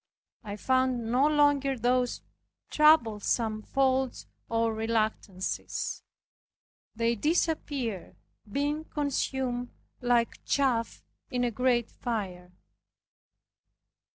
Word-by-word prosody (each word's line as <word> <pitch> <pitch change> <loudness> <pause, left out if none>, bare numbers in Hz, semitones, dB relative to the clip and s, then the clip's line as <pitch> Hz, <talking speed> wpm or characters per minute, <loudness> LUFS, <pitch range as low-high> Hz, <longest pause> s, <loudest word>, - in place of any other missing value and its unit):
I 205 -1 -5
found 255 -1 +1
no 260 +4 +4
longer 290 -3 +3
those 245 +1 +1 0.5
troublesome 225 -7 +3
faults 265 +1 0 0.2
or 230 0 +1
reluctances. 220 -4 -2 0.9
They 230 +1 +1
disappeared, 285 - -1 0.4
being 290 +5 -1
consumed 265 -4 -2 0.3
like 240 -1 +1
chaff 250 -5 0 0.3
in 250 -2 -1
a 240 - +1
great 240 0 +1
fire. 185 -7 -4
245 Hz, 80 wpm, -29 LUFS, 225-270 Hz, 0.9 s, no